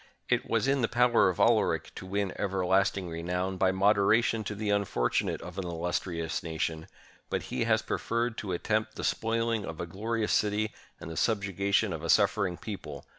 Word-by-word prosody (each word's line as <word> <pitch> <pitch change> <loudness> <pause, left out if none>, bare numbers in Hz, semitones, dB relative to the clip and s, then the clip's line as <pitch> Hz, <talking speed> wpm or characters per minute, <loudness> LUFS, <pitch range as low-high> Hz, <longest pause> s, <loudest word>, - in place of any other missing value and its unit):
It - - +1
was - - +1
in 135 -1 +2
the 115 - +2
power 120 -4 +4
of 90 - -4
Alaric - - +2
to 95 - -8
win 100 0 -1
everlasting 95 0 +1
renown 90 +3 -2
by 95 0 +3
moderation 105 +3 +3
to 105 - -4
the 105 0 -3
unfor 100 -12 +1
tunate - - 0
of 90 +2 -7
an - - -2
illustrious 85 -1 -2
nation; 80 -1 -3 0.4
but - - -1
he - - 0
has - - +2
preferred 115 0 -1
to 100 - -4
attempt 110 +4 -1
the - - -6
spoiling 115 -1 0
of 80 -3 -7
a - - -2
glorious 110 +5 -2
city 105 +1 +1 0.3
and 80 - -7
the 80 - -1
subju 100 -4 0
gation 100 +1 +2
of 80 - -5
a 85 - -5
suffering 100 -3 +3
people! 75 -10 -7
100 Hz, 185 wpm, -29 LUFS, 90-110 Hz, 0.4 s, power